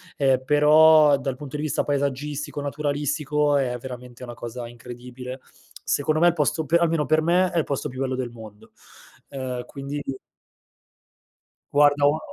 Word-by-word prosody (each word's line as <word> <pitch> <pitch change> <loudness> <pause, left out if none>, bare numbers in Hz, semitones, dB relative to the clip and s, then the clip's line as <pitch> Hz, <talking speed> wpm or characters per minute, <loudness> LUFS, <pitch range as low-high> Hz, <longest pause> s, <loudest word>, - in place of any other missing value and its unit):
ehm, 135 -2 +2
però 150 +1 +6
dal 135 -1 -3
punto 145 +2 -7
di - - -4
vista 155 -1 -1
paesaggistico, 145 +1 -3
naturalistico, 145 0 -1
è 130 -3 0
veramente 125 0 -10
una 120 -1 -7
cosa 120 +1 -7
incredibile, 125 +2 -9 0.4
secondo 155 +2 0
me 175 - +5
il 175 - +4
posto 155 0 0
pe 165 +4 +3
almeno 165 -3 +1
per 155 +1 +2
me, 175 +3 +2
è 170 - +1
il 155 - -1
posto 140 +1 -3
più 130 -1 -7
bello 130 -1 -1
del 125 -2 -4
mondo, 110 -3 -13 0.6
ehm, 130 -2 -5
quindi 140 +1 -6 1.7
Guarda, 145 0 +4
ho 145 +2 +2
145 Hz, 155 wpm, -24 LUFS, 125-150 Hz, 1.7 s, però